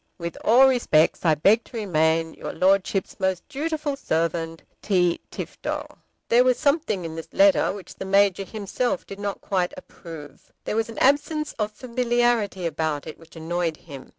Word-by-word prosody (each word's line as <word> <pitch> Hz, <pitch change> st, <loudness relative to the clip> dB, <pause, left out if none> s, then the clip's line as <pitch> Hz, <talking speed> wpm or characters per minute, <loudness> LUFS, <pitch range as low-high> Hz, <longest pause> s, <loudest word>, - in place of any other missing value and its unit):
With 170 Hz, -1 st, -5 dB
all 255 Hz, +4 st, +6 dB
respects 235 Hz, -12 st, +2 dB
I 160 Hz, -2 st, +5 dB
beg 205 Hz, +9 st, +4 dB
to 235 Hz, -, -9 dB
remain, 160 Hz, -5 st, +1 dB
Your -, -, -7 dB
Lordship's 190 Hz, +1 st, +1 dB
most 190 Hz, -2 st, -1 dB
dutiful 300 Hz, 0 st, -3 dB
Servant, 165 Hz, -, -2 dB, 0.2 s
T. 180 Hz, -4 st, +1 dB
TIFTO. -, -, -5 dB, 0.4 s
There 240 Hz, +2 st, +5 dB
was 255 Hz, -1 st, +3 dB
something 280 Hz, -, 0 dB
in 160 Hz, -1 st, -6 dB
this 165 Hz, 0 st, -8 dB
letter 295 Hz, -1 st, +4 dB
which 195 Hz, -1 st, -9 dB
the -, -, -7 dB
Major 195 Hz, 0 st, +3 dB
himself 220 Hz, +6 st, -3 dB
did 195 Hz, -, -9 dB
not 205 Hz, -1 st, -4 dB
quite 185 Hz, -2 st, -1 dB
approve. 160 Hz, -4 st, -12 dB
There -, -, -3 dB
was 225 Hz, 0 st, 0 dB
an 230 Hz, -, -9 dB
absence 300 Hz, +3 st, +2 dB
of 210 Hz, 0 st, -1 dB
familiarity 240 Hz, -4 st, 0 dB
about 155 Hz, -2 st, -2 dB
it 155 Hz, -, -9 dB
which 165 Hz, 0 st, -18 dB
annoyed 165 Hz, 0 st, -2 dB
him. 140 Hz, -5 st, -11 dB
195 Hz, 165 wpm, -24 LUFS, 165-240 Hz, 0.4 s, all